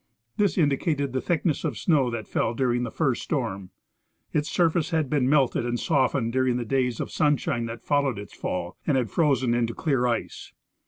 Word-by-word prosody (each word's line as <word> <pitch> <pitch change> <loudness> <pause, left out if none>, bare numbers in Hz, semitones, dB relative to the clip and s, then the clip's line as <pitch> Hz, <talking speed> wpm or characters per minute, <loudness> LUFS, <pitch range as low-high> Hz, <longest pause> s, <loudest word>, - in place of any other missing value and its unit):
This 205 -2 +1
indicated 145 -3 +1
the 130 - 0
thickness 165 -2 0
of 145 -9 -2
snow 140 - +2
that 115 -2 -5
fell 115 - -1
during 125 -1 +1
the 120 - -2
first 135 -1 0
storm. 100 - -3 0.6
Its 150 +1 0
surface 165 -2 +1
had 160 -6 0
been 135 -4 +2
melted 140 -5 +3
and 120 0 -2
softened 130 -5 +1
during 130 -1 +2
the 120 - -3
days 125 -1 0
of - - -4
sunshine 135 -5 +1
that 115 0 -7
followed 140 -5 +1
its 100 -1 -9
fall, 90 -1 -4
and 145 -4 +3
had 120 -6 -1
frozen 130 -7 +2
into 115 -1 0
clear 135 -6 +1
ice. 120 -1 -3
130 Hz, 190 wpm, -25 LUFS, 120-150 Hz, 0.6 s, melted